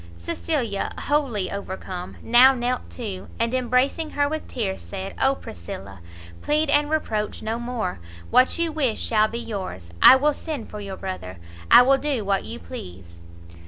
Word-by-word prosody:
Cecilia, 225 - -2
wholly 260 -10 0
overcome, 190 -2 -6
now 255 +3 +7
knelt 245 0 -2
too, 205 -7 -6
and 230 +1 0
embracing 255 +5 +1
her 285 0 +3
with 310 +1 -4
tears, 200 -6 -3
said 195 -1 -6
"Oh 270 +1 +4
Priscilla, 95 - -9 0.4
plead 300 0 +1
and 290 0 +3
reproach 220 -9 -2
no 220 +2 -2
more! 240 - -3 0.3
what 255 +1 +5
you 335 -1 0
wish 275 -8 0
shall 215 -1 +3
be 230 - -5
yours, 190 - -6
I - - +10
will 295 +3 +2
send 295 -6 -6
for 210 - -6
your 195 -2 -6
brother, 140 - -6 0.3
I - - +9
will 270 +2 +4
do 275 -8 -1
what 195 -1 0
you - - -6
please!" 85 +1 -10
230 Hz, 160 wpm, -24 LUFS, 190-270 Hz, 0.4 s, I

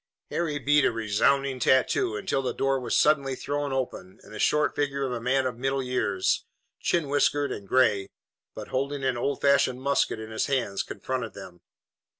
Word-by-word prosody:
Harry 160 -4 -1
beat 145 +1 +3
a - - +3
resounding 125 +5 +1
tattoo 125 -3 +2
until 120 +5 -1
the 130 - -3
door 135 0 +1
was 120 -3 0
suddenly 140 -3 +3
thrown 145 +1 -3
open 125 -8 -4
and - - -14
the - - -7
short 150 -2 +2
figure 140 -1 -1
of 130 - -3
a 120 -2 -3
man 130 +2 +1
of 125 -2 -3
middle 135 +1 -1
years, 125 -7 0 0.4
chin 170 -4 0
whiskered 145 0 +1
and 100 - -6
gray, 100 -5 +2 0.5
but - - -8
holding 140 +1 -2
an 130 -2 +1
old 135 +3 -1
fashioned 140 -2 +3
musket 135 -4 0
in 110 0 -8
his 110 - -1
hands, 125 -8 0
confronted 125 -4 -5
them. 90 -2 -11
130 Hz, 180 wpm, -26 LUFS, 115-140 Hz, 0.5 s, beat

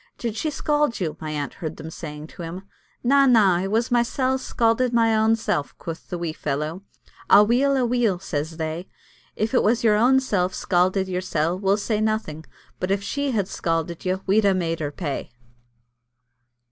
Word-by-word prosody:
"Did 230 -3 -3
she 310 - -1
scald 295 -3 0
you?" 165 -5 -2
my 155 - -5
aunt 145 -2 -3
heard 160 -4 -6
them 160 +1 -8
saying 150 -2 -7
to - - -11
him. 170 +3 -6 0.4
"Na, 275 +2 +5
na, 205 -8 +5
it 190 +2 -2
was 230 +4 0
mysel' 255 +2 +1
scalded 240 0 +1
my 230 -1 +4
ainsel'," 220 -8 +1
quoth 165 0 -8
the 180 - -3
wee 170 -2 -3
fellow. 155 +5 -3 0.5
"A 205 - +8
weel, 265 +5 +2
a 255 - +2
weel," 235 -5 +1
says 160 -2 -4
they. 160 +2 -4 0.5
"If 220 +3 -1
it 250 - +4
was 230 +3 +2
your 215 -2 +4
ainsel 235 -6 +3
scalded 185 +1 +1
yoursel', 180 -2 -1
we'll 195 0 +2
say 215 0 -1
nothing, 215 -8 -2 0.3
but 185 - -2
if 195 0 0
she 280 +7 -2
had 205 -7 0
scalded 165 -2 -2
you, 185 +1 -1
we'd 210 +3 +3
ha' 200 -1 +3
made 165 -2 -1
her 145 -2 -3
pay." 145 -2 -4
195 Hz, 180 wpm, -23 LUFS, 165-230 Hz, 0.5 s, A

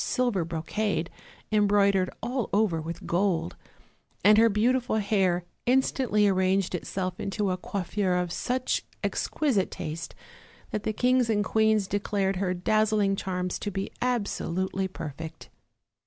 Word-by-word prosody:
silver 245 -8 +1
brocade, 170 +3 -2 0.4
embroidered 200 -3 +3
all 245 0 -2
over 200 -6 +2
with 165 +2 -6
gold, 175 - 0 0.7
and 210 +2 +7
her 230 0 +6
beautiful 240 +4 +1
hair 195 -4 +1 0.2
instantly 250 -4 +3
arranged 190 0 +2
itself 185 +1 -3
into 195 0 -1
a 180 - -1
coiffure 190 0 -1
of 180 -1 -1
such 255 +7 -1 0.2
exquisite 255 -12 0
taste 160 +1 -6 0.6
that 210 - -2
the 215 - -1
kings 250 +1 +2
and 210 -2 +2
queens 220 -2 +3
declared 195 -1 -1
her 185 -1 0
dazzling 210 +1 +2
charms 180 -2 -3
to 205 - -3
be 195 0 -4
absolutely 190 -6 -1
perfect. 160 -2 -8
200 Hz, 125 wpm, -27 LUFS, 180-215 Hz, 0.7 s, and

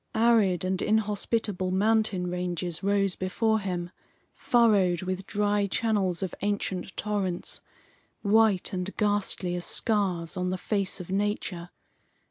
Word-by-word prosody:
Arid 220 -6 +3
and 185 0 -1
inhospitable 210 -2 0
mountain 205 -1 +1
ranges 175 -1 -3
rose 195 -1 +1
before 220 +4 0
him, 180 -3 -4 0.4
furrowed 200 -7 +3
with 185 +1 -4
dry 205 0 +1
channels 195 -4 0
of 190 - -3
ancient 200 -2 -2
torrents, 200 -4 -3 0.6
white 210 -3 +3
and 185 +1 -3
ghastly 205 -3 +1
as 175 0 -3
scars 190 -7 0
on 180 0 -1
the 185 - -2
face 200 0 -1
of 180 0 -7
nature. 195 -3 -2
195 Hz, 120 wpm, -27 LUFS, 180-210 Hz, 0.6 s, Arid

